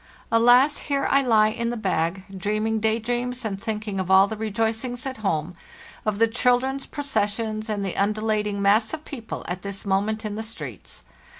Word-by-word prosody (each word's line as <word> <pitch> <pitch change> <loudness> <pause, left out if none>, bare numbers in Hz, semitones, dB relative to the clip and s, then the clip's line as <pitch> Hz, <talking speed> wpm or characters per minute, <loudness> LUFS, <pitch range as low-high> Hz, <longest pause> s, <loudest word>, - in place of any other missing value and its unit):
Alas! 245 +5 +5
here 275 -1 +1
I 275 - +5
lie 220 -4 +4
in 235 +2 -2
the 240 - -3
bag, 185 -3 -1
dreaming 215 +3 -1
day 220 +1 +2
dreams 245 +1 -2
and 195 -2 -3
thinking 210 -2 -3
of 185 -1 -3
all 190 +1 +7
the 220 - -4
rejoicings 225 +3 -2
at 265 -1 -4
home, 180 -5 -1 0.5
of 210 -1 +1
the 230 +1 +4
children's 250 +3 +1
processions 220 -5 -2
and 205 -2 -1
the 190 - -3
undulating 210 0 0
mass 220 +7 +3
of 310 - -14
people 235 -6 -7
at 180 +1 -4
this 200 +1 -5
moment 210 +3 0
in 210 - -3
the 215 - -4
streets. 220 0 -7
220 Hz, 180 wpm, -24 LUFS, 200-240 Hz, 0.5 s, all